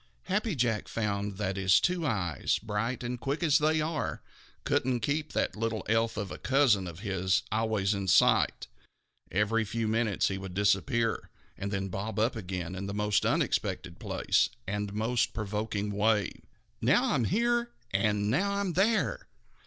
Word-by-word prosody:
Happy 205 0 -1
Jack 115 -4 0
found 100 -2 -2
that 95 -2 -2
his 95 -1 +5
two 175 -3 0
eyes, 90 - 0
bright 115 +4 -3
and 120 0 -3
quick 140 +6 -2
as 150 -3 +4
they 155 +1 +2
are, 155 -1 -2 0.4
couldn't 125 -1 +1
keep 150 +6 -1
that - - 0
little 110 0 -2
elf 115 0 +1
of 100 -4 -3
a - - -7
cousin 130 -9 +3
of 85 +1 -8
his 95 -3 0
always 110 -2 +1
in 100 -1 -3
sight. 90 - +4 0.7
Every 105 +4 +2
few 110 +1 -2
minutes 110 -2 +1
he 95 -1 -2
would 95 -2 -7
disappear 105 +3 +1 0.3
and 100 - -4
then 95 -1 -2
bob 100 +3 -4
up 115 +3 +1
again 90 -4 -4
in 95 +1 -5
the 100 - -4
most 105 0 +1
unexpected - - -1
place - - +1 0.2
and 105 0 -3
most 110 +3 0
provoking 105 -1 -2
way. 105 -1 +2 0.5
"Now - - +3
I'm 120 - +1
here, 235 - +1 0.2
and 105 +1 +1
now 200 - +1
I'm 200 -3 -1
there! 210 +6 +1
110 Hz, 160 wpm, -29 LUFS, 100-125 Hz, 0.7 s, his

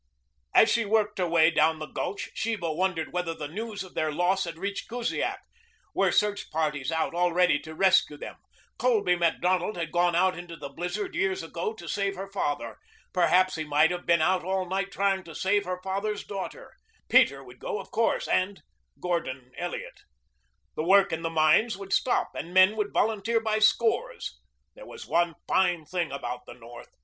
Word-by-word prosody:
As 220 - +8
she 235 - +2
worked 210 -1 +1
her 180 - +1
way 165 -1 +4
down 160 0 +3
the 155 - -5
gulch 195 +5 -4
Sheba 210 -8 -2
wondered 170 -1 -1
whether 175 -2 -2
the 150 - -5
news 210 +5 -5
of 185 - -13
their 155 -1 -1
loss 180 +4 +1
had 165 -1 -6
reached 200 +3 -4
Kusiak. 240 0 -2 0.6
Were - - +2
search 205 -1 +1
parties 150 -2 -1
out 160 0 -1
already 175 -2 +3
to 160 0 -10
rescue 185 -5 +3
them? - - -8 0.4
Colby 435 - +3
Macdonald 180 +3 +1
had 165 -2 -3
gone 175 0 +2
out 185 +1 +3
into 175 -1 -8
the 145 -3 -8
blizzard 180 +8 -4
years 190 -3 0
ago 170 +6 -4
to 170 -5 -11
save 200 +2 -1
her 195 +1 -5
father. 145 -7 -3 0.3
Perhaps 185 +1 +3
he 160 - -2
might 150 +2 +3
have 180 0 -5
been 170 -2 +4
out 185 +2 +2
all 190 0 -1
night 195 +2 -2
trying 195 -1 0
to 165 -3 -11
save 200 +2 +1
her 180 0 -3
father's 200 +2 -2
daughter. 205 - -7 0.3
Peter - - +4
would - - -15
go, - - -3
of - - -10
course, - - +1
and 190 +2 0 0.4
Gordon 130 -8 -3
Elliot. - - -5 0.8
The 155 - -2
work 195 +1 +5
in 160 - -2
the 165 - -1
mines 165 +7 +3
would 195 0 -5
stop 255 - +1
and 175 +2 -7
men 185 +3 +7
would 210 -2 -2
volunteer 220 +1 +1
by 220 -1 0
scores. 235 - +1 0.3
That - - -13
was - - -10
one 170 -1 +1
fine 175 -4 +2
thing 175 -2 -2
about 125 -2 -5
the - - -10
North. 120 0 -12
180 Hz, 185 wpm, -27 LUFS, 165-200 Hz, 0.8 s, As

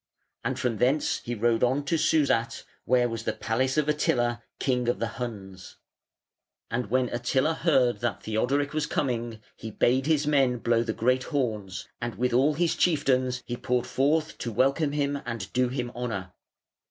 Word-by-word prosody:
And - - -2
from 120 -3 -1
thence 130 +6 +1
he 120 - -5
rode 115 +1 +1
on 135 +4 +1
to 165 - +1
Susat, 150 -7 +1 0.2
where 125 -1 +3
was 115 -2 -4
the - - -2
palace 130 +5 -1
of 150 -1 +2
Attila, 120 -5 +1 0.2
King 125 -2 0
of 120 - +1
the 115 0 -4
Huns. 95 -6 -7 1.0
And 120 -1 -1
when 130 +1 +2
Attila 130 +6 +1
heard 135 -7 +2
that 120 -2 -2
Theodoric 135 +7 0
was 155 -1 -1
coming, 120 -5 -2
he 110 - -7
bade 130 +5 +1
his 155 -2 +2
men 135 -4 +3
blow 115 0 +2
the 115 -1 -1
great 125 +3 +1
horns, 110 - -3
and 120 0 -3
with 125 0 0
all 140 +5 +3
his 170 +1 +1
chieftains 130 -6 +1
he 120 - -3
poured 125 0 -1
forth 155 +4 0
to 120 - -3
welcome 135 +6 +1
him 140 -1 -1
and 115 -6 -6
do 125 0 +2
him 125 -1 -3
honour. 100 -7 -4
125 Hz, 175 wpm, -27 LUFS, 115-140 Hz, 1.0 s, where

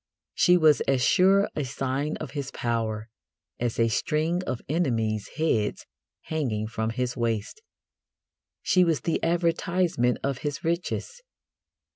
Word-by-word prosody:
She 180 0 +5
was 155 -3 +5
as 135 -2 +2
sure 195 +2 +4
a 150 - -1
sign 135 +3 -2
of 155 - -7
his 140 -2 -4
power 110 -2 -2 0.5
as 120 -1 -2
a 115 - +4
string 155 +8 0
of 130 -2 -3
enemies' 115 - 0
heads 115 -10 0 0.4
hanging 125 -10 -2
from 110 0 -2
his 125 +1 -2
waist. 115 - -2 1.0
She 185 - +4
was 165 -7 +1
the 165 - -1
advertisement 170 -5 +1
of 135 -2 -1
his 145 -1 -4
riches. 180 - -2
140 Hz, 130 wpm, -26 LUFS, 115-165 Hz, 1.0 s, She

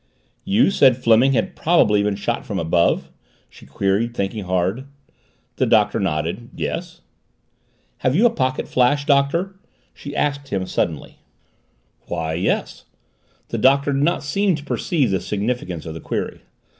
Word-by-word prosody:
"You 200 +3 +3
said 130 -9 +4
Fleming 125 +2 +4
had 185 +7 -1
probably 105 -12 +3
been 100 0 0
shot - - -2
from - - -5
above?" 85 +1 +1 0.4
she - - -17
queried, 105 +5 -1
thinking 100 0 -3
hard. 95 +7 -1 0.7
The - - +1
Doctor - - +3
nodded. 85 +10 -2
"Yes." - - -5 1.0
"Have 130 +1 +1
you 215 +8 +4
a 240 - +5
pocket 130 - -1
flash, 135 +3 +2
Doctor?" 165 +8 +1 0.3
she 145 0 -9
asked 140 -1 -1
him 95 -6 -2
suddenly. 80 -4 -3 0.9
"Why 80 -2 -3
yes 90 +4 -2 0.3
" - - -40
The - - -3
Doctor 140 +2 +3
did 135 - 0
not 170 +4 +1
seem 195 +5 +1
to 150 - -8
perceive 150 - 0
the 95 - +1
significance 100 -5 -3
of 80 - -6
the 80 - -8
query. - - -4
125 Hz, 150 wpm, -21 LUFS, 95-145 Hz, 1.0 s, a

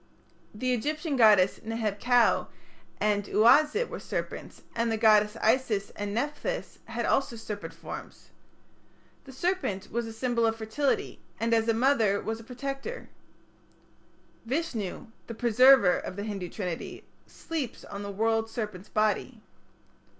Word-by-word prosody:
The 255 +4 0
Egyptian 300 +5 -2
goddesses 210 -6 +5
Neheb 220 -2 -3
kau 245 -1 +4 0.5
and 205 -1 +1
Uazit 295 - +4
were - - -7
serpents, - - -6
and 230 0 0
the 225 - 0
goddesses 215 -1 +4
Isis 220 -3 +1
and 205 0 -5
Nepthys 295 - -3
had - - -3
also 270 -3 +1
serpent 210 -2 -6
forms. - - -10 0.9
The 270 - -11
serpent 265 - -2
was 235 +1 -2
a - - -6
symbol 235 0 0
of 225 - 0
fertility, 225 +6 -1 0.2
and 230 +1 +1
as 225 0 +2
a 230 - +3
mother 225 -5 +3
was 225 0 -4
a - - -11
protector. 275 - -6 1.3
Vishnu, 235 - -3 0.2
the 230 - -6
Preserver 240 -3 +5
of - - -7
the 200 - -4
Hindu 195 -4 -4
Trinity, 180 -5 -5 0.2
sleeps 310 -8 -5
on 200 - -7
the 200 - -5
world 225 +2 0
serpent's 210 -4 -5
body. 215 +3 0
225 Hz, 135 wpm, -28 LUFS, 210-260 Hz, 1.3 s, goddesses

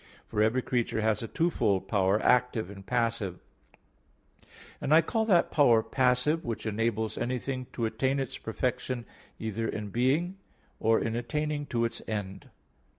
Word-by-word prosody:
For 105 - -1
every 115 +4 +2
creature 120 -3 0
has 110 -1 +1
a 115 - -4
twofold 105 - +1
power, 95 0 +2
active 125 -5 +2
and 100 -1 -10
passive; 115 -4 -1 1.4
and 150 - +4
I 165 - +6
call 220 +6 0
that 185 -6 +3
power 120 -7 +5
passive 130 +6 +2
which 115 -2 -4
enables 110 0 -1
anything 130 +1 -2
to 115 - -1
attain 130 +5 0
its 135 -3 -4
perfection 125 +1 -2 0.3
either 110 +1 -3
in 105 -1 -4
being, 145 - +1 0.4
or 110 0 +3
in 115 0 -2
attaining 145 +5 -2
to 120 -3 0
its 115 - -4
end. 100 -3 -5
115 Hz, 150 wpm, -29 LUFS, 110-130 Hz, 1.4 s, I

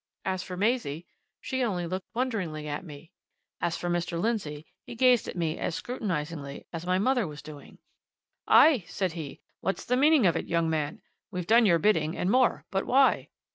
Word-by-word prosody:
As 185 -1 -1
for 180 0 -7
Maisie, 195 - 0 0.4
she 260 0 -2
only 185 -7 -1
looked 185 +2 -4
wonderingly 190 -12 -2
at 145 +5 -4
me; 155 0 -12 0.5
as 165 - -1
for 175 - -4
Mr. 175 -1 -1
Lindsey, 170 -9 -2 0.2
he 240 - -9
gazed 250 -1 +4
at - - -6
me 165 -3 -2
as 165 - -2
scrutinizingly 165 - -4
as 165 +1 -5
my 185 0 +2
mother 245 0 +1
was 150 -1 -9
doing. 150 -2 -12 0.7
"Aye!" 285 - +6
said 185 0 -2
he, 160 -4 -7 0.2
"what's 195 - -2
the 250 - +1
meaning 295 -3 +5
of 170 - +4
it, - - -3
young 170 -1 +1
man? 155 +6 -2 0.3
We've 180 -4 -4
done 225 +2 +5
your 170 -3 +5
bidding 160 -3 +1
and 180 - 0
more 255 0 +2
but 195 -1 -1
why?" 270 +1 +3
180 Hz, 185 wpm, -28 LUFS, 160-230 Hz, 0.7 s, Aye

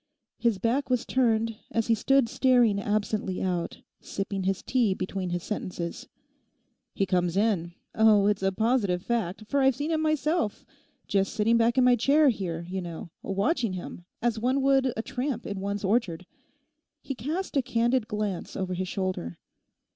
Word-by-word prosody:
His 235 -4 +2
back 250 +7 0
was 250 -2 +1
turned, 225 -3 +1
as 225 -1 0
he 230 - +3
stood 270 +3 +3
staring 245 -4 +3
absently 205 -2 -1
out, 180 -2 -2 0.2
sipping 195 -1 -4
his 195 0 -1
tea 235 -7 +1
between 185 -1 -3
his 175 0 -3
sentences. 180 -5 -5 0.9
'He 195 - +1
comes 180 -1 0
in—oh, 205 +2 +2
it's 205 -1 +1
a 195 0 +2
positive 205 -4 +1
fact, 220 -4 -2
for 280 +5 +1
I've 265 -1 +4
seen 295 +5 -2
him 315 -1 +1
myself, 310 - 0 0.4
just 195 -1 +1
sitting 225 +1 +3
back 230 +2 +3
in 255 - +5
my 250 0 +6
chair 280 +5 +4
here, 175 -7 -3
you 190 +1 -3
know, 170 -1 -7
watching 205 - 0
him 175 -1 -7 0.2
as 235 -2 +1
one 260 +4 +1
would 270 -1 +3
a 225 - -2
tramp 250 -2 -3
in 200 -1 -4
one's 200 +1 -3
orchard.' 190 -4 0 0.8
He 275 - -4
cast 305 - -4
a 275 - +4
candid 240 -1 +1
glance 210 -4 -3
over 185 -2 -2
his 185 +1 -3
shoulder. 185 - -3
215 Hz, 165 wpm, -27 LUFS, 190-250 Hz, 0.9 s, my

